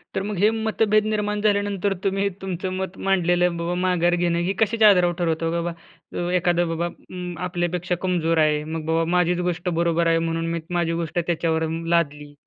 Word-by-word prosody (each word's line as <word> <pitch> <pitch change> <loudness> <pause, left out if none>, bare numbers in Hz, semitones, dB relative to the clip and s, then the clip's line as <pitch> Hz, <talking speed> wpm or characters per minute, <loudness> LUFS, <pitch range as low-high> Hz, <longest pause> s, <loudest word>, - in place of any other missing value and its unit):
तर 195 - 0
मग 205 -2 -4
हे 210 +4 +4
मतभेद 220 -1 +1
निर्माण 210 -1 -1
झाल्यानंतर, 205 -2 +1
तुम्ही 195 0 +1
तुमचं 185 0 -4
मत 190 0 -4
मांडलेलं 175 -2 +2
बाबा 170 +1 -2
माघार 175 -1 +2
घेणं, 170 -1 +1
हे 180 +3 0
कशाच्या 220 0 +5
आधारावर 180 -3 +4
ठरवतं, 165 -1 0
बाबा, 170 +1 -5
एखादं 175 -1 +2
बाबा 170 +1 -1
अं, 180 0 -8
आपल्यापेक्षा 175 0 -1
कमजोर 170 -3 0
आहे. 150 -1 +2
मग 160 0 -5
बाबा 165 0 +1
माझीच 180 0 +2
गोष्ट 175 +1 -3
बरोबर 170 0 +1
आहे, 165 0 +3
म्हणून 165 0 -2
मी 170 - -1 0.2
माझी 165 -1 0
गोष्ट 170 0 -2
त्याच्यावर 165 -1 0
अं, 165 +1 -3
लादली. 150 -3 0
175 Hz, 180 wpm, -23 LUFS, 165-190 Hz, 0.2 s, कशाच्या